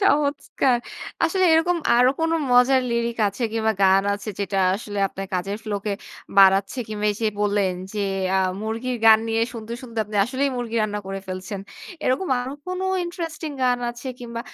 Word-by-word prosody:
চমৎকার 285 -7 +2 0.5
আসলে 375 +3 +2
এরকম 340 +2 +2 0.2
আরো 250 +1 +5
কোনো 325 0 +1 0.2
মজার 250 +1 +5
লিরিক 235 0 -1
আছে 205 +5 -7
কিংবা 220 -1 +1
গান 195 0 +5
আছে 205 +1 -6
যেটা 195 0 -1 0.2
আসলে 205 -1 -6
আপনার 195 0 -7
কাজের 195 +3 -2
ফ্লোকে 205 -1 -2 0.5
বাড়াচ্ছে 195 +5 +5
কিংবা 210 0 -2
এইযে 220 +1 -1
বললেন 200 -3 +1 0.2
যে 205 - 0 0.3
আ - - +3 0.2
মুরগির 230 +3 -3
গান 220 -1 +9
নিয়ে 225 0 +1
শুনতে, 230 0 -7
শুনতে 230 -3 -7
আপনি 210 0 -6
আসলেই 265 +3 -1
মুরগি 235 -2 -3
রান্না 210 -1 -2
করে 195 0 -4
ফেলছেন। 185 +1 -5 0.4
এরকম 260 +9 +1
আরো 255 +2 -5
কোনো 365 +1 -3 0.2
ইন্টারেস্টিং 330 -2 -5
গান 250 -1 +3
আছে 240 +2 -8
কিংবা 235 -1 -6
230 Hz, 165 wpm, -23 LUFS, 205-260 Hz, 0.5 s, গান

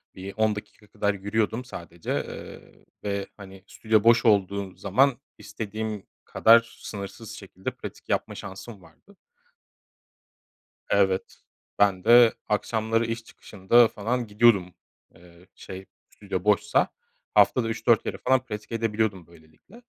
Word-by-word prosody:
Bir 95 +1 -8
10 110 -1 +2
dakika 105 0 -11
kadar 105 0 -1
yürüyordum 110 +4 -2
sadece, 85 -7 -8
eee, - - -7 0.2
ve, 100 -1 -3
hani, 95 -1 -12
stüdyo 110 -1 +1
boş 115 +1 +5
olduğu 100 -2 +1
zaman 130 +7 +2 0.2
istediğim 110 -1 -5 0.2
kadar 115 +1 +4
sınırsız 105 +2 -8
şekilde 95 -2 -7
pratik - - -11
yapma - - -1
şansım 95 +2 -9
vardı. 200 - -21 1.8
Evet, 95 -2 +1 0.4
ben 100 -3 +2
de 120 -1 +7
akşamları 110 +2 0
iş 115 0 -4
çıkışında 110 +3 +2
falan 115 +4 -3
gidiyordum. 105 -4 +3 0.4
Eee, 85 +1 -19
şey, 95 0 -10 0.2
stüdyo 100 -3 -5
boşsa. 105 -1 +2 0.5
Haftada, 105 +3 +4
3-4 115 0 +2
kere - - -5
falan 130 0 +2
pratik 110 -2 -8
edebiliyordum 110 -5 -1
böylelikle. 80 - -21
105 Hz, 120 wpm, -25 LUFS, 95-115 Hz, 1.8 s, de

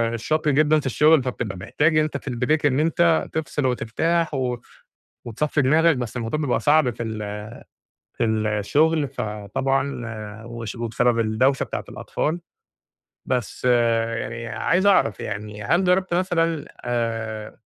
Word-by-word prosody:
شاق 155 +7 -1
جدًا 150 +2 +4
في 140 - -8
الشغل، 150 +2 +4
فبتبقى 115 -6 -4
محتاج 155 - +1
إن 155 - +4
أنت 150 -2 -2
في 135 - -7
الBreak 135 +5 0
إن 135 0 +3
أنت 165 +1 +2
تفْصل 150 -3 -2
وترتاح 155 +8 0
و 125 -2 -1 0.7
وتصفّي 145 +5 0
دماغك، 160 +3 +4
بس 125 0 -4
الموضوع 120 +6 -2
بيبقى 140 -5 0
صعب 150 -3 +4
في 120 0 -5
ال 105 -2 -5 0.7
في - - +1
الشغل، 110 +8 +1
فطبعًا 125 +3 -2 0.4
وش 115 -1 -6
وبسبب 115 +1 +1
الدوشة 115 +5 +2
بتاعة - - -5
الأطفال. 160 +3 -3 0.9
بس 125 -1 -2
يعني 115 -1 +1
عايز 185 - +1
أعرف 180 - +3
يعني، 105 0 -5
هل 175 - +2
جرّبت 180 0 +2
مثلًا 165 -4 0 0.2
آآ 115 -3 -3
130 Hz, 135 wpm, -23 LUFS, 115-155 Hz, 0.9 s, جدًا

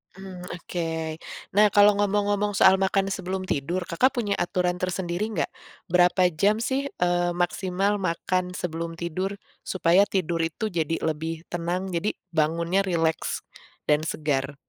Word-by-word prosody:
Mmm, 185 -2 -9
oke 165 -2 -4 0.3
nah 210 +2 +6
kalau 205 0 +8
ngomong-ngomong 205 0 +1
soal 190 -1 +6
makan 195 0 +1
sebelum 185 +1 -3
tidur 175 +2 -1
Kakak 215 +11 +1
punya 215 -4 -1
aturan 180 0 0
tersendiri 185 +2 -2
nggak, 210 -8 -2 0.4
berapa 180 0 +4
jam 200 +7 +3
sih, 275 +2 0
eee, 175 -5 0
maksimal 190 +3 0
makan 180 +1 -1
sebelum 165 -1 -4
tidur, 180 +4 -3 0.2
supaya 185 +2 +3
tidur 175 -4 -1
itu 165 +6 -2
jadi 165 -1 0
lebih 160 +1 -2
tenang 175 +2 -2
jadi 180 +5 -1 0.2
bangunnya 170 +4 +1
rileks, 165 -2 0 0.4
dan 150 +2 +2
segar? 145 -3 -1
180 Hz, 135 wpm, -25 LUFS, 165-195 Hz, 0.4 s, kalau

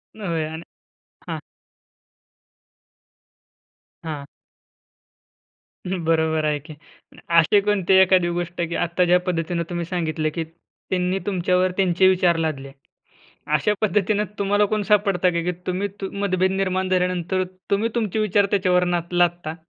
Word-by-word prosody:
होय 170 -7 -2
आणि 160 +1 -7 0.7
हां. - - -3 2.7
हां. 150 -3 -5 1.6
बरोबर 160 -3 0
आहे 150 -1 0
की 155 +2 -12 0.4
आणि - - -16 0.2
असे 185 +5 +4
कोणते 195 -2 +3
एखादी 185 -2 +4
गोष्ट, 175 0 -4
की 170 - -3
आत्ता 175 +1 0
ज्या 180 +1 +4
पद्धतीने 170 -1 -1
तुम्ही 175 -1 -3
सांगितले, 160 -3 -2
की 165 +2 -3
त्यांनी 180 +3 -4
तुमच्यावर 185 -1 +1
त्यांचे 185 -1 +3
विचार 180 -2 +3
लादले. 145 -4 -3 0.9
अशा 150 +8 +1
पद्धतीने 210 0 +1
तुम्हाला 205 +1 +2
कोण 215 -1 +1
सापडतं 195 -3 +2
का, 170 - 0
की 180 +2 -1
तुम्ही 185 +3 -1 0.2
मतभेद 190 -2 0
निर्माण 190 -1 -1
झाल्यानंतर 185 0 0 0.3
तुम्ही 205 +3 +2
तुमचे 220 -3 -1
विचार 205 -1 +2
त्याच्यावर 180 -3 +2
नाद 175 -1 -2
लादता? 175 -2 +1
180 Hz, 125 wpm, -22 LUFS, 170-195 Hz, 2.7 s, असे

